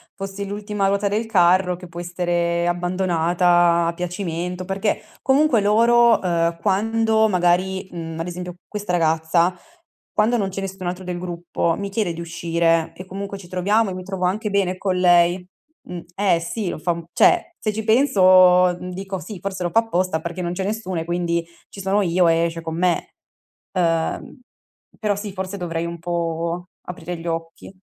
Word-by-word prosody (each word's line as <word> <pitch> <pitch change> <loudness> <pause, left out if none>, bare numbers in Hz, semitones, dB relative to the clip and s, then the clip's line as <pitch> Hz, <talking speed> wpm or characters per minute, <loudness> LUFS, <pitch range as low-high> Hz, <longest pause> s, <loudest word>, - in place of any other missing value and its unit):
fossi 195 +1 -5
l'ultima 205 0 -2
ruota 200 +1 +1
del 210 +3 -1
carro, 180 -3 +3
che 180 0 -11
può 170 0 -9
essere 175 -1 -1
abbandonata 175 -1 +2
a 170 - -1
piacimento, 180 0 -4
perché 195 +3 -1 0.2
comunque 270 -2 +3
loro, 230 +3 +4
ehm, 170 -2 0
quando 220 +2 +2
magari 185 0 +1
mhmm, 165 -2 -6
ad 165 - -3
esempio 180 0 -6
questa 205 -3 -4
ragazza, 165 +1 +2 0.6
quando 225 +3 +2
non 195 -3 -1
c'è 195 +1 -5
nessun 190 -1 -5
altro 180 +1 -4
del 180 -1 -4
gruppo, 170 -1 -2
mi 200 0 -4
chiede 195 -3 -1
di 165 - -7
uscire 165 -1 0
e 185 - -9
comunque 195 +1 -6
ci 185 -3 -12
troviamo 200 +4 +1
e 185 - -4
mi 185 0 -6
trovo 190 -1 -3
anche 210 +4 -1
bene 190 -2 0
con 190 -1 -1
lei. 175 0 +4 0.4
Mh 180 - -6 0.2
eh 190 -4 +2
sì 175 +4 -3
lo - - -4
fa 170 +3 -1
un 170 0 -4
cioè, 345 - +3
se 215 -1 -1
ci 220 - -3
penso 185 -7 +5 0.2
dico: 190 +1 -5
"Sì, 185 +3 -8
forse 190 -2 -4
lo 175 - -1
fa 225 - +5
apposta 185 -7 -1
perché 170 +2 -5
non 175 0 -2
c'è 190 - -3
nessuno 195 -4 -3
e 165 - -6
quindi 170 -1 -1 0.2
ci 195 - -9
sono 195 +2 +1
io 180 -1 +2
e 165 +1 +3
esce 165 0 -4
con 160 0 -5
me", 180 0 0 0.6
uhm, 165 +4 -1 0.6
però 210 -2 0
sì, 205 -1 -6
forse 190 +1 -5
dovrei 170 -2 -3
un 170 0 -6
po' 170 0 -2 0.2
aprire 175 0 -6
gli 165 - -8
occhi. 165 +3 -5
180 Hz, 180 wpm, -22 LUFS, 170-200 Hz, 0.6 s, penso